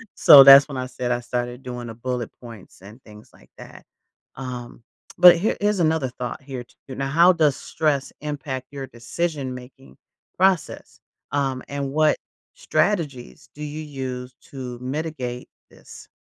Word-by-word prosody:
So, 140 -2 +9
that's 135 +1 +9
when 140 -3 -7
I 130 - -3
said 125 -1 -4
I 120 - 0
started 120 +1 -4
doing 125 -2 -7
the 115 - -7
bullet 125 0 -4
points 115 -7 -13
and 105 +6 -14
things 105 0 -16
like - - -22
that. - - -13 0.5
Um, 125 -2 -8 0.3
but 180 0 +9
here 195 +6 -1
here's 205 -1 +1
another 160 -4 +1
thought 125 +2 -6
here 130 -2 -7
t 120 - -28
now 135 +1 -4
how 170 +5 +5
does 155 -5 +2
stress 150 -4 -2
impact 145 -3 -5
your 135 -2 -7
decision-making 130 0 -6 0.4
process? 185 -3 0 0.3
Um, 135 -2 -1
and 140 -1 -4
what 155 +1 +2 0.4
strategies 165 - -2
do 150 - -8
you 150 +1 -6
use 130 -4 -6 0.2
to 125 -3 -7
mitigate 130 -2 -5 0.2
this? - - -15
135 Hz, 150 wpm, -22 LUFS, 125-150 Hz, 0.5 s, So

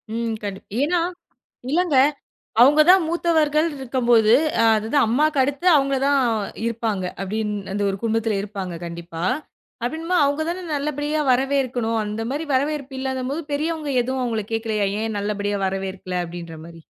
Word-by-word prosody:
ம், 230 -1 -1
கண்டிப் 195 -1 -6 0.2
ஏன்னா, 340 +4 +2 0.7
இல்லங்க 325 -3 +2 0.6
அவங்கதான் 305 +7 +6
மூத்தவர்கள் 320 -2 +2
இருக்கும்போது, 235 -4 +3 0.3
அ - - +4
அதுதான் 225 +5 +1
அம்மாக்கு 295 +5 +2
அடுத்து 285 +6 -2
அவங்கதான் 275 0 +2 0.5
இருப்பாங்க 220 -5 -2 0.2
அப்படின்னு 210 +2 -2 0.2
அந்த 205 0 -1
ஒரு 195 - -3
குடும்பத்துல 225 -2 0
இருப்பாங்க 195 -4 -5
கண்டிப்பா. 170 0 -6 0.6
அப்படின்னுபோது 325 +6 0
அவங்கதானே 315 +6 -1
நல்லபடியா 295 +1 -1
வரவேற்கணும்? 250 -3 +1
அந்த 210 +2 -4
மாரி 295 +4 -2
வரவேற்பு 280 0 -1
இல்லாதம்போது 265 +2 -2
பெரியவங்க 310 0 -2
எதுவும் 260 +1 -2
அவங்கள 225 -3 -2
கேட்கலையா? 220 -2 0 0.2
ஏன் 220 -2 -2
நல்லபடியா 205 0 -2
வரவேற்கல 190 -1 -3
அப்படின்ற 170 -1 -8
மாரி? 165 0 -12
250 Hz, 125 wpm, -22 LUFS, 210-290 Hz, 0.7 s, அவங்கதான்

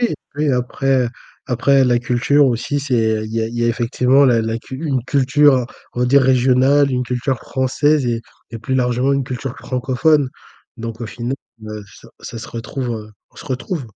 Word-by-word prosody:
Oui, 240 - +1 0.2
oui, 150 -1 +1
après 125 +1 +1 0.4
après 135 +2 +3
la 120 -1 +3
culture 125 +4 +2
aussi, 130 +3 -1
c'est 115 -5 +1
il 110 - -8
y 115 - +1
a 110 - 0
il 115 - -8
y 120 - +1
a - - +2
effectivement 125 +4 +3
la 120 -4 +4
la 110 0 -2
cu 130 - -9
une 135 -5 0
culture, 135 -1 +3 0.3
on 125 - +1
dit, 135 +3 +5
régionale, 130 +2 +4
une 125 -1 0
culture 125 +1 -2
française 135 +3 +1
et 115 -1 -1 0.3
et 115 - -6
plus 130 +4 -3
largement 125 +1 +1
une 140 -1 0
culture 125 +1 -5
francophone. 130 +3 +1 0.5
Donc 115 -1 -6
au 115 - -4
final, 120 +5 -4 0.3
heu, 105 0 -6
ça 105 +3 -16
ça 115 - -8
se 110 - -8
retrouve 120 +2 -5
heu, 110 -2 -6 0.2
on - - -28
se - - -10
retrouve. 135 +2 -4
125 Hz, 195 wpm, -19 LUFS, 120-135 Hz, 0.5 s, dit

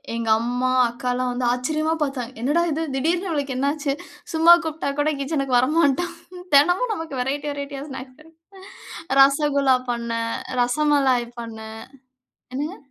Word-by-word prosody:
எங்கம்மா, 235 +3 +1 0.2
அக்கால்லாம் 250 +1 -2
வந்து 245 0 -2
ஆச்சரியமா 310 +5 -1
பாத்தாங்க. 260 -3 -4
"என்னடா 295 +7 +2
இது! 315 +2 -2
திடீர்ன்னு 340 +7 0
இவளுக்கு 285 -5 -2
என்ன 275 +2 +1
ஆச்சு? 295 -2 -2 0.4
சும்மா 325 +2 +7
கூப்பிட்டா 315 -2 -3
கூட 305 +1 +2
கிட்சனுக்கு 275 -3 0
வரமாட்டா". 305 +4 +2 0.5
தெனமும் 355 - +4
நமக்கு 325 -8 -6
வெரைட்டி 285 +3 -2
வெரைட்டியா 280 -1 -6
ஸ்நாக்ஸ் 260 0 -9
கெடைக்குது. 330 +5 -17 0.5
ரசகுல்லா 280 -1 +4 0.2
பண்ணேன், 230 -1 -2 0.3
ரசமலாய் 265 -2 +2
பண்ணேன். 220 -1 -8 0.8
என்னங்க? 300 +8 -3
280 Hz, 125 wpm, -22 LUFS, 250-310 Hz, 0.8 s, சும்மா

